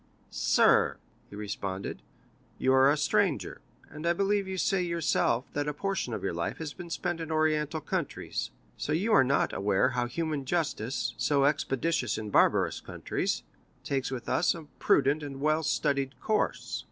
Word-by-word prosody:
"Sir," - - +3 0.3
he - - -10
responded, 100 -2 -4 0.6
"you 130 - +2
are 130 +1 +6
a 145 - +3
stranger, 150 - 0 0.3
and 155 +2 -6
I 170 - +4
believe 200 +2 +1
you 190 0 -4
say 190 +1 +1
yourself 165 -7 +1
that 145 0 -1
a 150 - -2
portion 195 -6 -2
of 110 - -4
your 95 - -1
life 85 0 -3
has 155 -3 -5
been 175 -2 -9
spent 170 +1 -2
in 165 -1 -5
Oriental 155 0 +1
countries, - - -3 0.3
so 150 - -2
you 205 +8 +1
are 170 - +7
not 135 +2 +1
aware 100 +5 +2
how 125 -1 -1
human 155 +2 -2
justice, 130 -6 -1
so 140 -2 +2
expeditious 150 +2 0
in 105 -1 -5
barbarous - - +3
countries, - - -3 0.4
takes 135 -3 -1
with 125 -3 -5
us 160 +9 +2
a 165 - -8 0.2
prudent 140 +2 +3
and 140 -2 -6
well 155 +2 +2
studied 140 -3 0
course." 215 -1 -1
145 Hz, 165 wpm, -29 LUFS, 130-165 Hz, 0.6 s, are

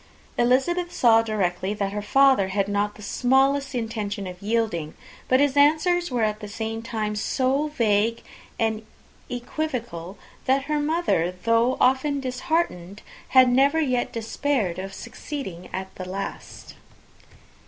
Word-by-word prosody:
Elizabeth 345 +9 +1
saw 230 -8 +5
directly 200 -3 -1
that 200 -1 -2
her 210 +1 -3
father 265 -2 +4
had 195 +1 0
not 205 0 -1
the 210 - -12
smallest 270 +4 +2
intention 215 -3 -3
of 180 -1 -8
yielding; 205 -8 -1 0.3
but 255 - +4
his 285 -1 +2
answers 315 +5 +3
were 245 -3 0
at 215 -1 0
the 210 - -7
same 225 +2 -4
time 220 -3 -3
so 265 +7 0
vague 230 -5 +1 0.3
and 220 -1 -1 0.5
equivocal, 240 - -4 0.3
that 265 +1 +2
her 300 +1 -1
mother, 295 - 0
though 230 +2 +3
often 265 +3 +2
disheartened, 250 - -2 0.2
had 260 -1 +6
never 275 +5 +3
yet 255 -5 0
despaired 225 -4 -1
of 195 +1 -5
succeeding 195 - -7
at 190 0 -4 0.2
last. 195 +2 -7
230 Hz, 130 wpm, -24 LUFS, 205-275 Hz, 0.5 s, had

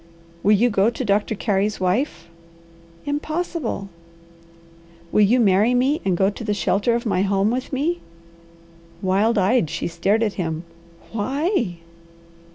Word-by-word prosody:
"Will 210 - +4
you 235 +4 +3
go 205 +2 +3
to 240 +2 -4
Doctor 205 +1 +1
Carey's 205 0 0
wife?" 185 - -1 0.8
"Impossible!" 300 - -3 1.2
"Will 210 - +3
you 220 +5 +4
marry 215 +3 +4
me 265 +5 +2
and 185 -3 +1
go 195 +2 +3
to 220 - -8
the 210 -1 -1
shelter 205 +4 +1
of 235 - -3
my 200 -4 +1
home 200 +2 +1
with 255 +1 -3
me?" 310 +6 -1 1.0
Wild 200 +5 +2
eyed 195 -2 +2
she - - -3
stared 195 +6 +1
at 210 -3 0
him. 160 -1 -3 0.5
"Why?" 255 - -1
210 Hz, 140 wpm, -22 LUFS, 195-250 Hz, 1.2 s, Will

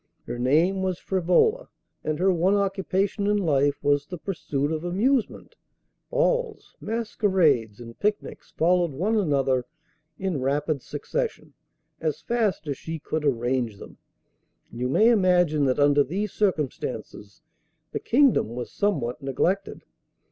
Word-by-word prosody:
Her 120 +1 -5
name 165 +10 +2
was 185 -2 -1
Frivola, 190 - +2 0.4
and 155 -1 -1
her 185 +2 +3
one 180 +4 +2
occupation 195 0 0
in 210 0 +2
life 145 -6 +1
was 145 0 +2
the 180 - -6
pursuit 150 -5 -3
of 160 0 -3
amusement. 215 +8 0 0.6
Balls, - - -1
masquerades, 190 - +1
and 115 -1 -11
picnics 210 0 -2
followed 175 -1 +2
one 195 +11 0
another 135 - +1 0.5
in 185 -8 -2
rapid 145 +2 0
succession, 465 - -4 0.5
as 155 -3 -2
fast 225 -8 -1
as 140 -2 -3
she 165 0 -5
could 155 0 -4
arrange 120 -4 0
them, - - -13 0.7
and 115 - -9
you 125 +1 -1
may 215 - +4
imagine 180 -8 +3
that 130 -1 +1
under 145 0 +4
these 190 +8 -3
circumstances 150 - -3 0.5
the - - -3
kingdom 245 - +2
was 125 -1 -5
somewhat 150 - -1
neglected. 175 +9 -1
170 Hz, 135 wpm, -25 LUFS, 140-200 Hz, 0.7 s, may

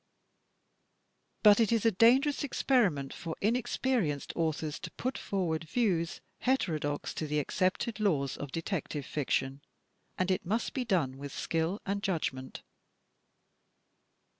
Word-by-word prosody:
But 210 -1 +8
it 225 -2 +3
is 230 -1 +2
a 225 - +6
dangerous 260 +9 +4
experiment 205 - +1
for 165 -1 -5
inexperienced 230 - 0
authors 155 -2 -1
to 180 - -6
put 255 +9 -3
forward 170 -5 -2
views 170 -3 0 0.2
heterodox 155 - 0
to 155 - -3
the 150 +1 -1
accepted 185 - 0
laws 145 -10 +1
of 145 -2 -6
Detective 160 -4 -3
Fiction, 135 -1 -1 0.6
and 185 +1 +1
it 185 - 0
must 220 +6 -1
be 255 -2 -2
done 150 - 0
with 140 0 -6
skill 165 +8 -1
and 200 +1 -1
judg 185 -9 0
ment. 130 0 -9
180 Hz, 130 wpm, -31 LUFS, 150-225 Hz, 0.6 s, But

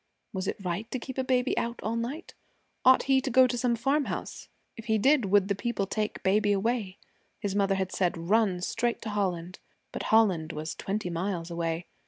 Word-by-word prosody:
Was 190 -1 -3
it - - -2
right 185 +6 -3
to 255 - -2
keep 260 +1 -6
a - - +1
baby 255 0 +1
out 235 +1 -3
all 220 +2 -1
night? 250 +9 -4 0.5
Ought 260 0 +6
he 270 -1 +3
to 270 - -3
go 260 +1 +6
to 250 -1 -1
some 240 0 +1
farmhouse? 275 +5 -2 0.3
If 225 - -10
he 220 -1 +2
did, 265 +2 +4
would 195 0 +3
the 200 - +1
people 205 0 -2
take 210 +2 -3
baby 205 +2 +3
away? 205 -1 -1 0.4
His 200 -2 -2
mother 195 -1 +2
had 190 -1 -2
said, 180 -3 0
'Run 185 +1 +1
straight 235 +5 -1
to 220 - -4
Holland.' 185 -3 -2 0.3
But - - -5
Holland 185 -8 +3
was 155 +1 -4
twenty 195 -2 -3
miles 170 0 -3
away. 170 0 -2
205 Hz, 200 wpm, -28 LUFS, 185-240 Hz, 0.5 s, Ought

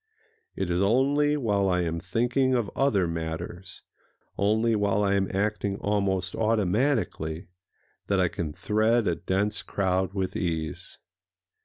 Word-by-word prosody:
It 95 -2 -2
is 90 +1 +1
only 140 +8 +3
while 100 -7 +1
I 90 -1 +2
am 85 -1 -2
thinking 120 +8 +1
of 115 -5 -1
other 105 -10 +2
matters,—only 90 +6 -3
while 105 0 +1
I 100 -1 +2
am 100 -1 +1
acting 100 0 -1
almost 100 -3 -1
automatically,—that 100 - -2
I 90 - +3
can 80 -2 -4
thread 110 +6 +1
a 85 - +2
dense 95 +5 -1
crowd 95 0 -1
with 95 -2 -2
ease. 80 -3 -3
100 Hz, 125 wpm, -27 LUFS, 90-110 Hz, -, only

